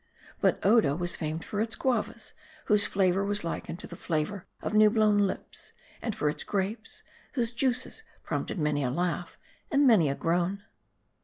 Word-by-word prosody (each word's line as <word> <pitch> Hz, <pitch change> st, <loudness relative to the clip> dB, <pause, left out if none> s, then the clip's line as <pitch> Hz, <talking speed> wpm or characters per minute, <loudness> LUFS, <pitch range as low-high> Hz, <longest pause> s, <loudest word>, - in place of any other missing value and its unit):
But -, -, +3 dB
Odo 205 Hz, -9 st, +5 dB
was 175 Hz, +1 st, -2 dB
famed 160 Hz, 0 st, -4 dB
for 210 Hz, -, -2 dB
its 225 Hz, 0 st, -1 dB
guavas, 245 Hz, -5 st, -1 dB, 0.3 s
whose 210 Hz, 0 st, +4 dB
flavor 190 Hz, -1 st, +2 dB
was 205 Hz, +1 st, 0 dB
likened 165 Hz, 0 st, -4 dB
to -, -, -7 dB
the -, -, -9 dB
flavor 170 Hz, +4 st, -2 dB
of -, -, -4 dB
new 215 Hz, 0 st, +7 dB
blown 210 Hz, -2 st, +4 dB
lips; -, -, -7 dB, 0.3 s
and 225 Hz, -4 st, -2 dB
for 150 Hz, -, 0 dB
its 150 Hz, -, -1 dB
grapes, 205 Hz, +3 st, -3 dB, 0.3 s
whose 240 Hz, -4 st, 0 dB
juices 250 Hz, -, -1 dB, 0.2 s
prompted -, -, -3 dB
many 150 Hz, -3 st, +1 dB
a 125 Hz, -, +1 dB
laugh 175 Hz, +4 st, -2 dB, 0.3 s
and 285 Hz, -1 st, +4 dB
many 205 Hz, -, +6 dB
a 135 Hz, -, -1 dB
groan. 175 Hz, +5 st, 0 dB
200 Hz, 170 wpm, -29 LUFS, 170-220 Hz, 0.3 s, new